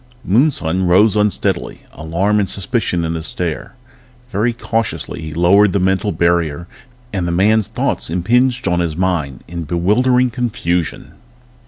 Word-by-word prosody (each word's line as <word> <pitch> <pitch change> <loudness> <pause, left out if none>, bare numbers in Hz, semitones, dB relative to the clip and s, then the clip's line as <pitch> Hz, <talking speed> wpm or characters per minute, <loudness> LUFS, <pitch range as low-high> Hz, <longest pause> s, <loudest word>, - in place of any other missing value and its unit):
Moonson 95 - +1
rose 100 +5 +4
unsteadily, 105 -1 -1
alarm 95 +7 0
and 100 - 0
suspicion 100 -4 -1
in 80 - -2
his 80 0 -4
stare. 85 +6 -4 0.6
Very 110 +5 +1
cautiously 115 -6 -3
he 80 0 -6
lowered 95 +5 +4
the 100 - +2
mental 95 +2 +1
barrier 85 -2 0 0.5
and 90 -3 -1
the - - -1
man's 105 +4 +2
thoughts - - -2
impinged 120 +8 +1
on 90 -1 +1
his 85 -3 -2
mind 85 -8 -1
in 85 +1 -5
bewildering 120 - +2
confusion. 105 - -2
95 Hz, 140 wpm, -17 LUFS, 85-110 Hz, 0.6 s, rose